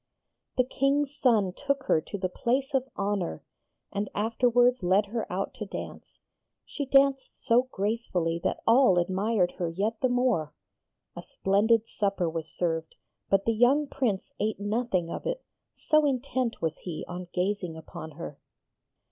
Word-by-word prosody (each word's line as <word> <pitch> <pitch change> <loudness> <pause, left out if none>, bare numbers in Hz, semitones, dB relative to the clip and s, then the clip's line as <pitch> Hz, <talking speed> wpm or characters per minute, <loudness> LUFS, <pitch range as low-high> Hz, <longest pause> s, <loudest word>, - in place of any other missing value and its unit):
The 255 - +5
King's 275 +2 0
son 220 -9 +3
took 280 +4 -1
her 160 - +2
to 200 - -6
the 185 -1 -1
place 260 +9 -1
of 265 0 0
honour, 200 - -2 0.5
and 200 +1 -2
afterwards 245 +3 +3
led 190 +3 +3
her 220 +2 -4
out 190 +2 -2
to 210 - -3
dance. - - -8 0.5
She 285 -3 -5
danced 275 0 +3
so 250 +1 +2
gracefully 190 -5 -1
that - - -1
all 230 -5 +5
admired 190 +2 +1
her 175 -2 0
yet 210 +6 -2
the 255 - +3
more. 245 - +1 0.6
A - - -6
splendid 215 +3 +2
supper 200 -5 -1
was 165 -1 -3
served, 165 0 -2 0.3
but 195 0 +3
the 230 - +2
young 250 +7 +4
Prince 245 -9 -2
ate 215 0 -1
nothing 205 -5 -1
of - - -4
it, - - -3 0.3
so 305 0 +2
intent 255 -4 -1
was 160 -1 -1
he 165 -4 -6
on 180 0 -6
gazing 180 -3 -1
upon 160 0 -9
her. 165 -4 -7
210 Hz, 155 wpm, -28 LUFS, 180-250 Hz, 0.6 s, The